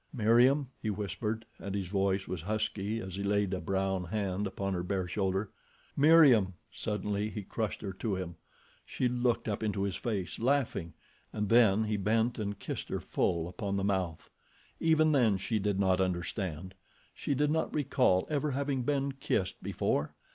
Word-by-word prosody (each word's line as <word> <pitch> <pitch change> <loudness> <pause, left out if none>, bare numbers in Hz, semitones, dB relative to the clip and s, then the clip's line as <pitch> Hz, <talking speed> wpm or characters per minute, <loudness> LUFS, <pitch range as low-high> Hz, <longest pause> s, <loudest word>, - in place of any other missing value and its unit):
"Meriem," 125 +2 +4
he 110 - -2
whispered 105 +2 -3
and 100 0 -4
his 95 -3 -2
voice 95 0 0
was 90 -3 -4
husky 110 +2 -2
as 95 -2 -6
he - - -3
laid 100 -1 +1
a 90 - -2
brown 95 +1 -1
hand 100 +1 -2
upon 95 0 -3
her 90 - -1
bare 95 0 -2
shoulder. 95 +1 -1 0.4
"Meriem!" 140 - +6 0.2
Suddenly 105 0 -2
he 105 -1 -5
crushed 110 +2 -3
her 95 -2 -4
to 95 +2 -2
him. 90 -2 -5 0.5
She 125 - -1
looked 120 -1 0
up 105 -2 -2
into 105 -2 -1
his 100 -2 -1
face, 95 -8 -3
laughing, 120 - 0 0.4
and 105 -2 -2
then 110 -3 +5
he 105 -1 -1
bent 110 +4 +1
and 100 -1 -3
kissed - - -5
her - - -2
full 85 -1 0
upon 100 +2 -3
the 95 - -1
mouth. 95 -5 -1 0.5
Even 155 -1 +4
then 120 -9 +4
she 110 +3 -1
did 100 -1 0
not 95 -1 +3
understand. 90 -1 -2 0.4
She 140 - -2
did 150 +2 +2
not 160 +1 0
recall 125 -10 +2
ever 150 0 0
having 140 -1 -1
been 140 +1 0
kissed 100 -8 -2
before. 75 - -1
105 Hz, 170 wpm, -31 LUFS, 95-120 Hz, 0.5 s, Meriem